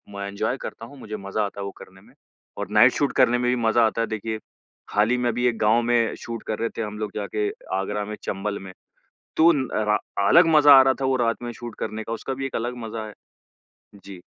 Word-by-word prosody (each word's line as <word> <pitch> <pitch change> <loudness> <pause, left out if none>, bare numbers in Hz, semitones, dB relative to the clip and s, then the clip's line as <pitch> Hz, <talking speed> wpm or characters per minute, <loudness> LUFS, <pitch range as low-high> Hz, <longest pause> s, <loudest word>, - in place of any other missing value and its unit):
मैं 100 0 -4
एन्जॉय 110 +5 -2
करता 115 - -7
हूँ, 140 +5 -14
मुझे 110 -2 -6
मज़ा 100 +2 -2
आता 100 0 -7
है 100 - -4
वो 100 - -5
करने 95 0 -14
में - - -21 0.4
और - - -4
नाइट 110 +4 +6
शूट 145 - 0
करने 125 -2 +4
में 125 - +1
भी 125 - +2
मज़ा 115 +1 +4
आता 115 - -2
है 115 - 0
देखिए। 110 0 -4 0.5
हाल 105 +2 +2
ही 125 - +2
में 125 -1 0
अभी 120 +1 0
एक 120 -2 0
गाँव 110 +2 +3
में 115 -1 +1
शूट 115 -1 -6
कर 110 - -3
रहे 115 - -1
थे - - -1
हम 105 0 -6
लोग 105 -1 -3
जाके 105 0 -2 0.3
आगरा 105 +2 -2
में, 105 +1 -6
चंबल 100 +1 -3
में, 95 -1 -10 0.7
तो 165 +2 +7
न 135 -3 -1
र 105 0 +2 0.3
अलग 170 - +6
मज़ा 145 -1 +8
आ - - +9
रहा 130 0 +3
था - - +1
वो 130 0 +2
रात 115 +1 -1
में 120 - -4
शूट 120 -1 -9
करने 110 +1 -4
का 115 - -5
उसका 115 +4 -4
भी 135 +1 -4
एक - - -8
अलग 120 +2 -3
मज़ा 110 0 -5
है। 105 - -10 0.9
जी। 95 -3 -10
110 Hz, 250 wpm, -24 LUFS, 105-120 Hz, 0.9 s, आ